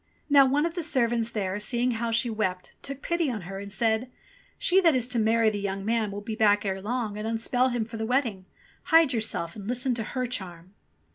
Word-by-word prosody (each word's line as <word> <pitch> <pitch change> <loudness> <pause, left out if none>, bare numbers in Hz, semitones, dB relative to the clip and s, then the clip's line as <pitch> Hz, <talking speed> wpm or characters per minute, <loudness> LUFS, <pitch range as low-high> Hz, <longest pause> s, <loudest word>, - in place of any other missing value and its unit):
Now 280 -2 +7
one 290 +4 +2
of 335 - -2
the 355 - -4
old 330 - -1
servants 235 -5 +1
there, 205 -3 -2
seeing 240 +3 0
how 230 0 -2
she 230 +2 +1
wept, 190 -5 -2
took 275 0 -8
pity 340 -3 0
on 225 -5 -3
her 195 +2 -7
and 200 0 -8
said, 225 +3 0 0.5
"She 380 +2 +3
that 330 -6 +4
is 245 -2 0
to 245 -2 0
marry 225 0 +3
the 205 - -3
young 195 -1 -3
man 225 -1 +1
will 205 +1 -6
be 220 +1 -5
back 205 -2 +3
ere 190 -1 -2
long, 215 -1 -3
and 215 - -3
unspell 235 +3 +1
him 240 -2 -1
for 225 0 -8
the 220 - -2
wedding. 235 -7 0 0.4
Hide 325 -5 +5
yourself 215 -7 -1
and 200 -2 -8
listen 250 +2 0
to 230 -1 -2
her 255 +3 -3
charm." 185 -6 -6
225 Hz, 230 wpm, -27 LUFS, 205-255 Hz, 0.5 s, Now